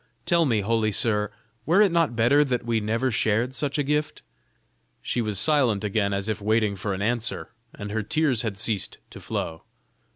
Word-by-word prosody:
Tell 170 -1 +3
me, 115 -7 +1
holy 110 +1 +1
sir, 105 0 +1 0.3
were 170 - +3
it 205 -3 +5
not 165 -7 +1
better 125 +6 +4
that 125 -4 -2
we 115 -1 +1
never 115 +5 -1
shared 115 +3 0
such 140 +2 -2
a 145 - +1
gift?" 150 +2 -2 0.8
She 120 - -2
was 105 -3 -1
silent 125 -4 +2
again 100 -1 0
as 100 +1 -2
if 110 -1 -3
waiting 110 -1 +1
for 95 +1 -3
an 95 - -4
answer, 120 +1 -2 0.2
and 105 0 -7
her 110 +1 -1
tears 130 +2 +1
had 110 -5 -4
ceased 100 -1 -2
to - - -10
flow. 80 -1 -4
115 Hz, 190 wpm, -25 LUFS, 105-135 Hz, 0.8 s, it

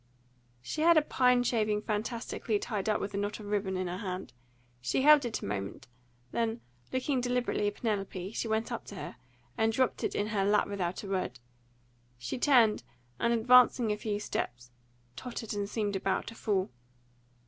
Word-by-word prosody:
She 305 - -3
had 335 0 +6
a 310 - +5
pine 250 -3 +3
shaving 215 -3 +1
fantastically 220 0 -2
tied 210 -1 -3
up 215 - +2
with 200 +1 -4
a - - -2
knot 205 +2 -2
of 210 - -9
ribbon, 200 -2 -1
in 185 - -1
her 180 +1 -4
hand. 185 -3 -5 0.5
She 125 - 0
held 295 -2 +7
it 235 - -3
a - - -3
moment; 100 -1 -4 0.5
then, 230 0 -1 0.3
looking 260 0 0
deliberately 245 -4 0
at 205 - -2
Penelope, 195 -4 -3
she 230 - -3
went 220 +2 -1
up 235 - -3
to 205 - -9
her, 155 - -7 0.4
and 220 0 +3
dropped 255 +2 0
it - - -1
in 205 +1 0
her 205 -2 +1
lap 205 +1 +3
without 190 -2 -3
a - - -6
word. 185 -10 -2 0.8
She 125 - -4
turned, 240 -6 +5 0.4
and, 235 - +2
advancing 240 0 +5
a - - +1
few 210 -1 -3
steps, 120 - -4 0.4
tottered 225 - -5
and 205 -1 -2
seemed 210 -3 -1
about 190 0 0
to - - -7
fall. 195 - -1
210 Hz, 180 wpm, -31 LUFS, 195-235 Hz, 0.8 s, held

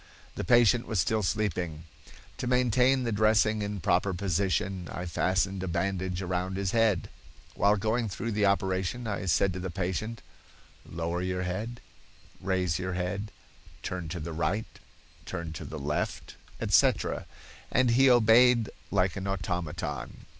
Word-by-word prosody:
The - - -4
patient 120 +3 +4
was 110 -4 -1
still 110 +3 +1
sleeping. 90 -6 -1 0.6
To - - -2
maintain 125 +1 +3
the 115 - -1
dressing 110 0 +3
in 100 0 -3
proper 90 +3 +1
position, 95 -1 -1
I 90 - -5
fastened 95 +2 0
a 95 - -3
bandage 95 +1 -2
around 90 +1 -2
his 95 -1 -1
head. 115 -6 +2 0.5
While 100 +1 +3
going 110 +2 0
through 115 +5 -4
the 105 -1 +2
operation 95 +4 0
I 100 -2 -3
said 95 +2 +2
to 90 - -5
the 95 +1 -4
patient, 95 +5 -3 0.7
'Lower 85 +1 -2
your 90 0 -2
head, 105 +7 -4 0.6
raise 90 -2 0
your 90 0 -3
head, 100 +4 -3 0.5
turn 90 -3 -4
to 85 +1 -4
the 80 +1 -5
right, 95 +7 -1 0.6
to 85 -3 -4
the 80 +1 -7
left,' 75 +2 -3 0.3
etc., - - +2 0.4
and 130 -2 +3
he 135 +3 +5
obeyed 120 -1 +5 0.2
like 95 -2 +1
an 100 0 -4
automaton. 90 -9 -4
95 Hz, 145 wpm, -29 LUFS, 90-110 Hz, 0.7 s, he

